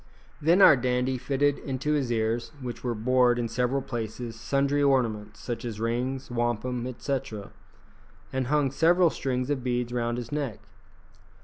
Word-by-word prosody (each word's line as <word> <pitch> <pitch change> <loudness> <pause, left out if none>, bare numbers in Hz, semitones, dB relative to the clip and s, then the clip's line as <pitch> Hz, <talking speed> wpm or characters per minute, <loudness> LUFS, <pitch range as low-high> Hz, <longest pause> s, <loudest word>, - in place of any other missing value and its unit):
Then 170 +6 +5
our 145 - +9
dandy 125 0 0
fitted 140 +2 +1
into 135 +2 -2
his 135 -5 0
ears, 115 +1 -1
which 125 -3 -6
were 120 -2 -1
bored 125 +2 +3
in 120 -1 -1
several 125 +4 0
places, 115 0 -5
sundry 140 +4 0
ornaments, 115 -7 +1
such 120 -2 -5
as 115 -3 -5
rings, 125 +3 -2
wampum, 120 +1 -1
etc., 125 -4 -4 0.8
and 130 -1 -1
hung 145 -1 +2
several 170 +4 +4
strings 130 0 -2
of 135 -3 -1
beads 125 -1 -1
round 120 -1 -1
his 120 -1 -6
neck. 145 -7 -2
125 Hz, 150 wpm, -27 LUFS, 120-135 Hz, 0.8 s, our